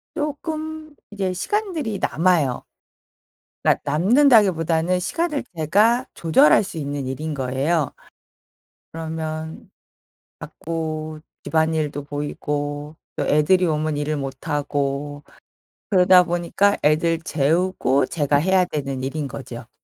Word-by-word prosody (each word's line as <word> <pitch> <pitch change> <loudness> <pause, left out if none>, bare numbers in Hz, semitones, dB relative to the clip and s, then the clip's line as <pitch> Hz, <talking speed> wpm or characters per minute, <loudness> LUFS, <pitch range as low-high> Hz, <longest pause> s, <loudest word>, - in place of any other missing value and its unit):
조금 310 0 -4 0.2
이제 190 -3 -2
시간들이 310 - -2
남아요. 160 -7 +1 1.0
그러니까 - - +4
남는다기보다는 180 - +3
시간을 300 - -1
제가 210 - +3
조절할 160 +1 +4
수 190 - -9
있는 145 -3 -4
일인 150 +4 -4
거예요. 140 +3 -1 1.0
그러면 160 -1 -6 0.7
자꾸 155 -1 -5 0.2
집안일도 160 -3 0
보이고 145 0 -4 0.2
또 - - -1
애들이 155 +5 +3
오면 155 -2 0
일을 150 0 -2
못하고 145 +1 -3 0.7
그러다 180 -1 +6
보니까 175 +4 +1
애들 160 +3 +2
재우고 155 -3 +1
제가 145 -3 0
해야 185 +4 +3
되는 140 -5 -4
일인 140 +2 -3
거죠. 120 -3 -8
160 Hz, 250 characters per minute, -22 LUFS, 145-185 Hz, 1.0 s, 그러다